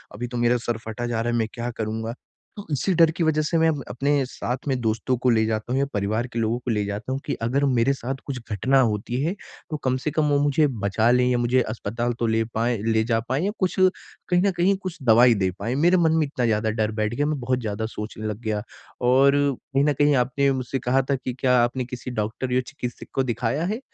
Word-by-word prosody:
अभी 120 Hz, +3 st, -4 dB
तो 120 Hz, 0 st, -5 dB
मेरा 120 Hz, +1 st, +3 dB
सर 120 Hz, -, 0 dB
फटा 120 Hz, +2 st, -4 dB
जा 115 Hz, -1 st, -1 dB
रहा 120 Hz, +1 st, -1 dB
है, 120 Hz, -, +1 dB
मैं 110 Hz, -, 0 dB
क्या 120 Hz, 0 st, -4 dB
करूँगा? 110 Hz, +1 st, -3 dB, 0.4 s
तो 205 Hz, -, -7 dB
इसी 145 Hz, +7 st, +1 dB
डर 165 Hz, -1 st, +5 dB
की 170 Hz, -, +1 dB
वजह 155 Hz, -1 st, +2 dB
से, 155 Hz, +2 st, 0 dB
मैं 160 Hz, 0 st, +4 dB
अब 145 Hz, -4 st, -2 dB
अपने 140 Hz, +5 st, +1 dB
साथ 125 Hz, 0 st, -4 dB
में 130 Hz, -2 st, 0 dB
दोस्तों 115 Hz, +3 st, 0 dB
को 125 Hz, +1 st, +1 dB
ले 110 Hz, -2 st, +3 dB
जाता 110 Hz, +1 st, -2 dB
हूँ 135 Hz, -, +1 dB
या 140 Hz, -, +2 dB
परिवार 105 Hz, +4 st, -1 dB
के 115 Hz, -, -2 dB
लोगों 115 Hz, +1 st, 0 dB
को 125 Hz, -1 st, -3 dB
ले 105 Hz, -2 st, 0 dB
जाता 100 Hz, +5 st, -4 dB
हूँ 135 Hz, -, -1 dB
कि -, -, -1 dB
अगर 130 Hz, +5 st, +1 dB
मेरे 130 Hz, 0 st, +2 dB
साथ 135 Hz, 0 st, -4 dB
कुछ 135 Hz, -3 st, -4 dB
घटना 130 Hz, +7 st, +2 dB
होती 115 Hz, +2 st, -1 dB
है, 165 Hz, +4 st, 0 dB, 0.4 s
तो 155 Hz, -, -2 dB
कम 130 Hz, -1 st, +1 dB
से 150 Hz, +4 st, -3 dB
कम 150 Hz, -2 st, +1 dB
वो 145 Hz, -1 st, +3 dB
मुझे 145 Hz, +1 st, +3 dB, 0.2 s
बचा 110 Hz, +3 st, +2 dB
लें 125 Hz, 0 st, +4 dB
या 125 Hz, -, +2 dB
मुझे 120 Hz, +2 st, +2 dB
अस्पताल 115 Hz, +2 st, -2 dB
तो 115 Hz, -, +1 dB
ले 115 Hz, 0 st, +2 dB
पाएँ 115 Hz, +1 st, +1 dB
ले 110 Hz, 0 st, +2 dB
जा 115 Hz, 0 st, +1 dB
पाएँ 135 Hz, +7 st, 0 dB
या 205 Hz, -, 0 dB
कुछ 185 Hz, -2 st, 0 dB, 0.5 s
कहीं 180 Hz, 0 st, +3 dB
न 200 Hz, -, +3 dB
कहीं 185 Hz, +3 st, +3 dB
कुछ 185 Hz, -3 st, -5 dB
दवाई 120 Hz, +1 st, +6 dB
दे 95 Hz, -2 st, +1 dB
पाएँ। 115 Hz, +5 st, -2 dB
मेरे 175 Hz, +6 st, +4 dB
मन 165 Hz, -2 st, +3 dB
में 155 Hz, -, +3 dB
इतना 140 Hz, -3 st, -2 dB
ज़्यादा 110 Hz, -1 st, +1 dB
डर 110 Hz, 0 st, -1 dB
बैठ 110 Hz, 0 st, -1 dB
गया, 145 Hz, -, +1 dB
मैं 150 Hz, -1 st, -1 dB
बहुत 130 Hz, +1 st, 0 dB
ज़्यादा 110 Hz, -2 st, -3 dB
सोचने 110 Hz, 0 st, -6 dB
लग 105 Hz, -1 st, -4 dB
गया। 110 Hz, -3 st, -2 dB, 0.4 s
और 130 Hz, +3 st, +5 dB, 0.4 s
कहीं 135 Hz, +1 st, +3 dB
न 150 Hz, -, +3 dB
कहीं 145 Hz, +1 st, +3 dB
आपने 135 Hz, +2 st, +2 dB
मुझसे 130 Hz, 0 st, -2 dB
कहा 130 Hz, +2 st, +2 dB
था -, -, +3 dB
कि, 130 Hz, -1 st, -4 dB
क्या 125 Hz, 0 st, +2 dB
आपने 125 Hz, +1 st, -1 dB
किसी 125 Hz, +1 st, -7 dB
डॉक्टर 110 Hz, +3 st, -3 dB
या 130 Hz, -, +3 dB
चिकित्सक 125 Hz, -4 st, -7 dB
को 135 Hz, -, +2 dB
दिखाया 120 Hz, +4 st, -1 dB
है? 215 Hz, +5 st, -2 dB
125 Hz, 255 wpm, -24 LUFS, 115-140 Hz, 0.5 s, दवाई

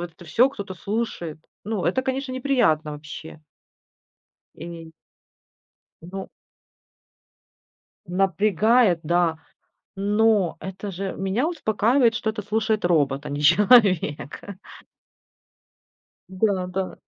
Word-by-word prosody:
вот 175 Hz, +1 st, -9 dB
всё 230 Hz, +10 st, +3 dB
кто-то 200 Hz, -8 st, -7 dB
слушает. 195 Hz, -5 st, -4 dB, 0.3 s
Ну, 215 Hz, -3 st, -2 dB
это, 225 Hz, +9 st, +1 dB
конечно, 265 Hz, 0 st, -3 dB
неприятно 245 Hz, -, +1 dB
вообще. 155 Hz, +1 st, -9 dB, 1.1 s
Эй. 165 Hz, 0 st, -9 dB, 1.1 s
Ну. 190 Hz, +3 st, -7 dB, 1.8 s
Напрягает, 195 Hz, +2 st, +2 dB
да. 170 Hz, 0 st, +1 dB, 0.6 s
Но 205 Hz, -2 st, +2 dB
это 190 Hz, +2 st, -6 dB
же 190 Hz, +1 st, -4 dB
меня 195 Hz, +9 st, -1 dB
успокаивает, 235 Hz, -5 st, +2 dB
что 220 Hz, -, -1 dB
это 215 Hz, 0 st, -4 dB
слушает 215 Hz, 0 st, -1 dB
робот, 145 Hz, -5 st, +1 dB
а -, -, -5 dB
не 145 Hz, +1 st, -4 dB
человек, 185 Hz, -, +4 dB
а. 200 Hz, -, -8 dB, 1.8 s
Да, 190 Hz, -1 st, 0 dB
да. 185 Hz, +1 st, -4 dB
195 Hz, 100 wpm, -23 LUFS, 170-220 Hz, 1.8 s, человек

